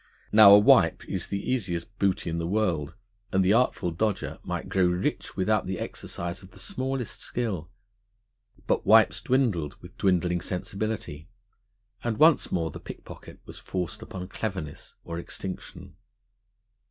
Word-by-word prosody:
Now, 105 -2 +10
a - - +9
wipe 105 - +4
is - - -3
the 100 0 -4
easiest 95 -6 -2
booty 95 -3 +1
in 85 - -2
the 85 - -2
world, 85 -6 0 0.4
and 95 -1 +2
the 95 - +4
Artful 115 -7 +2
Dodger 105 +5 -2
might - - -4
grow 95 -2 +2
rich 90 +2 -2
without 105 +2 +1
the 95 -1 -2
exercise 85 0 -5
of 95 - -14
the - - -18
smallest 135 - -3
skill. 100 -10 -3 1.0
But - - +1
wipes - - +5
dwindled, 110 - +1
with - - -13
dwindling 90 -2 +2
sensibility; 95 -4 -4 0.7
and 115 -3 -1
once 160 0 +5
more 80 -2 -1
the - - -8
pickpocket - - -11
was - - -9
forced 90 -3 -4
upon 90 -1 -7
cleverness 95 -9 -5
or 85 0 -5
extinction. 95 +2 -7
95 Hz, 145 wpm, -27 LUFS, 85-110 Hz, 1.0 s, Now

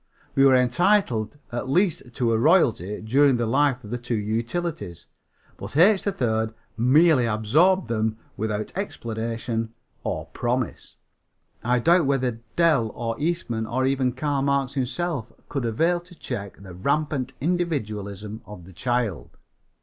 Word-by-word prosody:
We 135 - +5
were 135 -1 +6
entitled 130 - +2
at 120 +2 -4
least 170 -5 +1
to 120 -2 0
a - - +3
royalty 115 - +3
during 135 +3 +4
the 120 - 0
life 130 +1 +2
of 105 - -10
the 120 - -2
two 120 0 -2
utilities, 110 - -3 0.5
but - - -6
H. 190 +4 +6
3rd 110 - 0 0.2
merely 130 +2 +4
absorbed 150 - +3
them 110 -1 -1 0.2
without 105 0 -3
explanation 115 - -3 0.3
or - - -3
promise. 120 -1 -2 0.7
I 125 +2 +2
doubt 165 +4 +4
whether 125 -4 0
Dell 155 -10 +3
or 115 -1 -2
Eastman 145 -9 -1
or 130 +3 0
even 130 -2 +1
Karl 140 +1 -1
Marx 140 -1 +1
himself 140 -1 -2 0.2
could 135 -4 -2
avail 165 +10 +1
to 175 +1 -16
check 100 - -6
the 95 -2 -10
rampant 140 - -1
individualism 110 - -2
of 100 -5 -10
the 95 - -14
child. 120 0 -2
125 Hz, 140 wpm, -24 LUFS, 110-150 Hz, 0.7 s, were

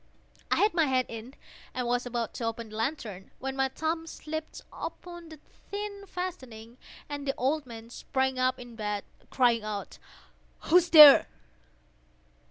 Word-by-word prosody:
I - - +3
had 420 +1 +3
my 330 -2 +3
head 260 -2 +1
in, 230 +3 -8 0.4
and 250 -1 -2
was 245 +1 0
about 240 -1 -3
to - - -6
open 230 0 -4
the 215 - -10
lantern, 220 -5 -4
when 270 0 -4
my 270 0 +2
thumb 325 +4 -3
slipped 315 0 -6
upon 345 -2 -8
the 315 -2 -12 0.3
tin 405 0 -5
fastening, 255 -12 -7 0.3
and 285 -1 -6
the 275 - 0
old 280 +2 0
man 230 -1 -10
sprang 265 +1 -1
up 255 0 +2
in 245 -2 -11
bed, 210 -2 -3 0.3
crying 240 -4 +2
out—"Who's 310 - -2
there?" 300 -4 +10
260 Hz, 150 wpm, -28 LUFS, 230-315 Hz, 0.4 s, there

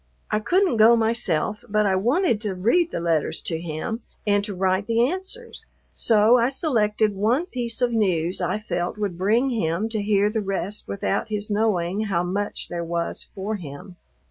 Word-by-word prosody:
I 215 - +2
couldn't 350 - +2
go 225 +2 +7
myself, 220 -4 0
but 210 0 +2
I 190 -1 +2
wanted 240 - +1
to 205 -4 -3
read 240 - +2
the - - -3
letters 165 -3 0
to 165 -1 -3
him 170 +8 -4 0.2
and 205 -1 +2
to 205 -2 -5
write 190 +2 0
the 230 +1 +3
answers; 380 - -5 0.3
so 225 +2 +4
I 235 +2 +3
selected 215 -7 +1
one 225 - +1
piece 245 -7 -2
of 245 - +2
news 185 -5 0
I 180 +3 0
felt 175 -3 -3
would 205 -4 -2
bring 220 +9 +2
him 210 -1 -1
to 220 -2 -2
hear 205 0 +2
the 220 0 -1
rest 195 +1 -3
without 100 -1 -1
his 210 -1 -4
knowing 205 -2 0
how 175 -4 0
much 200 +3 -3
there 170 -1 -4
was 170 0 -2
for 205 +2 -5
him. 165 +2 -10
210 Hz, 180 wpm, -23 LUFS, 185-230 Hz, 0.3 s, go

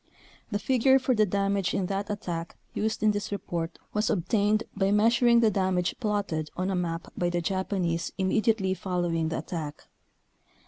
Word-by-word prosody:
The 205 - 0
figure 260 +5 +4
for 260 -1 +1
the 215 -2 +3
dam 200 +1 +1
age 190 -2 0
in 190 - 0
that 200 +2 -3
attack 175 -5 -4 0.2
used 220 0 -1
in 215 - +5
this 205 0 -3
report 170 -4 -3 0.2
was 210 +1 +1
obtained 210 +3 +2
by 195 -1 +1
measuring 235 +3 +4
the 220 -2 +4
damage 185 -2 +1
plotted 200 -9 -1
on 185 +2 0
a - - 0
map 170 -2 -3
by 175 - 0
the 175 0 0
Japanese 175 -2 -1
immediately 195 0 +2
following 175 -4 -1
the 160 - -2
attack. 155 -3 -5
195 Hz, 170 wpm, -27 LUFS, 175-210 Hz, 0.2 s, in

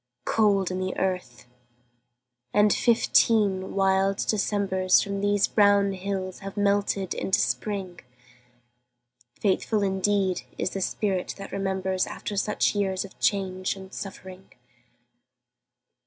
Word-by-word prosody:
Cold 200 -4 +2
in 185 - -3
the 185 0 -3
earth, 180 -11 -3 1.1
and 210 0 +5
fifteen 210 -5 +2
wild 195 0 +2
Decembers 195 -3 +2
From 200 0 -3
these 205 0 +2
brown 200 -1 +4
hills 190 -1 -4
have 195 +1 -8
melted 200 -2 +1
into 190 - 0
Spring. 195 -4 -2 1.4
Faithful 205 +1 +1
indeed 195 -1 +1 0.2
is - - -1
the 195 - -4
spirit 190 -1 -2
that 195 - -9
remembers 190 -1 -1
After 205 - -6
such 210 +1 +1
years 195 -2 -1
of 195 - -15
change 185 -2 0
and 190 -1 -12
suffering! 190 -1 -9
195 Hz, 110 wpm, -26 LUFS, 190-205 Hz, 1.4 s, and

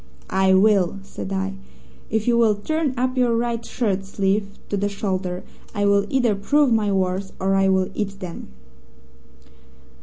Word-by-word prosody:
"'I 190 0 +4
will!' 195 -2 +3
said 195 0 -7
I. 195 0 -1 0.6
'If 220 0 -1
you 240 - +4
will 225 -3 +4
turn 300 +5 -1
up 255 +1 0
your 245 -2 +2
right 235 -1 -1
shirt 200 -6 -1
sleeve 200 +1 -1
to - - -1
the 200 +1 0
shoulder, 185 -3 -3 0.3
I 205 0 +1
will 200 0 +3
either 245 -5 +2
prove 270 +6 +2
my 210 -2 +2
words 190 0 -1
or 190 +1 +1
I 195 0 +3
will 190 -1 +2
eat 195 -2 -3
them.' 180 -3 -7
200 Hz, 160 wpm, -22 LUFS, 190-230 Hz, 0.6 s, I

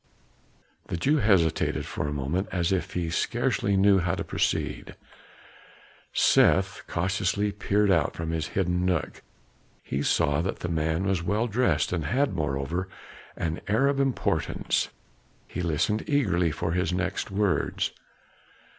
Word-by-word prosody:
The - - -3
Jew 145 - +2
hesitated 95 - +2
for 75 - -3
a - - -2
moment 75 +7 -2
as 85 -1 0
if 95 -2 -1
he 85 -2 -2
scarcely 120 0 0
knew 100 0 +5
how 85 -1 0
to - - -3
proceed. - - -2 1.2
Seth 95 -1 +3
cautiously 95 +3 0
peered 100 0 +1
out 80 -5 +2
from 80 0 -3
his 80 -1 -2
hidden 90 -2 +1
nook; 90 -5 -1 0.6
he 70 - -2
saw 70 +1 +2
that 95 - -3
the 90 - -3
man 80 +1 0
was 95 -3 0
well 105 +7 0
dressed 105 -10 +1
and 80 -4 -1
had, 130 - +1
moreover, 80 +3 -2 0.5
an 80 0 -3
air 110 +7 +3
of 140 0 +1
importance. 135 -2 0 0.6
He - - -5
listened 85 - 0
eagerly 95 - +2
for 85 +2 -2
his 90 +1 0
next 95 +1 -2
words. 100 -1 0
90 Hz, 140 wpm, -27 LUFS, 80-100 Hz, 1.2 s, knew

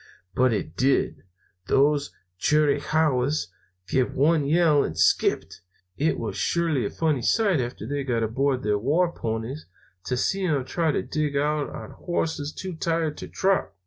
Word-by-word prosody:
But 130 -1 +3
it 85 -7 -3
did. 130 -6 +1 0.4
Those 145 +1 +3 0.3
Chiricahuas 150 - +1 0.4
give 130 +2 0
one 150 +1 +3
yell 155 -2 +4
and - - -4
skipped. - - +1 0.3
It 155 +3 0
was - - -4
surely 160 -10 0
a - - -5
funny 155 -6 0
sight, 195 - +2
after 120 -2 -5
they 140 +3 -2
got 120 -4 0
aboard 130 +4 0
their 105 0 +1
war 165 - +2
ponies, 115 +3 -4 0.4
to 125 - -1
see 190 +8 0
them 140 -6 0
trying 160 +3 0
to - - 0
dig 150 -2 -2
out 150 0 0
on - - -8
horses 160 -4 -3
too 185 +2 -6
tired 165 -1 -1
to - - -7
trot. 190 - 0
145 Hz, 155 wpm, -25 LUFS, 130-160 Hz, 0.4 s, yell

